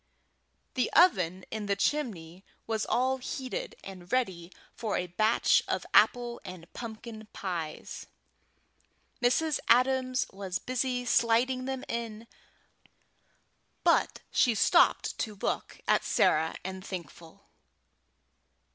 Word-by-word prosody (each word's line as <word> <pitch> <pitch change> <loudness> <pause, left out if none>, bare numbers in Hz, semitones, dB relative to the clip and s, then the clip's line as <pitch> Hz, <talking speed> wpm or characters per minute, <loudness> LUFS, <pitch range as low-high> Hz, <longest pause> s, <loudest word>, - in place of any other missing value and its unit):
The 250 -3 0
oven 185 - +4
in 215 -2 -4
the 200 - +1
chimney 195 - -2 0.2
was 220 -1 -2
all 260 +2 +1
heated 270 - -5
and 185 -2 -10
ready 190 -9 -1 0.2
for 220 -3 -2
a 180 - -1
batch 215 +6 +3
of - - -2
apple 240 -1 +4
and 180 -2 -9
pumpkin 220 -1 -8
pies. 170 -5 -5 1.1
Mrs. 285 +5 +2
Adams 255 +1 +3
was 190 -2 -3
busy 255 +1 -2
sliding 245 +2 +2
them 265 -1 -3
in, 230 -1 -4 1.6
but - - +2
she 240 -3 +3
stopped - - +3
to 215 -3 -3
look 200 - -3
at - - +3
Sarah 160 +1 +2
and 190 0 -6
Thankful. 170 -3 -9
225 Hz, 110 wpm, -29 LUFS, 185-255 Hz, 1.6 s, oven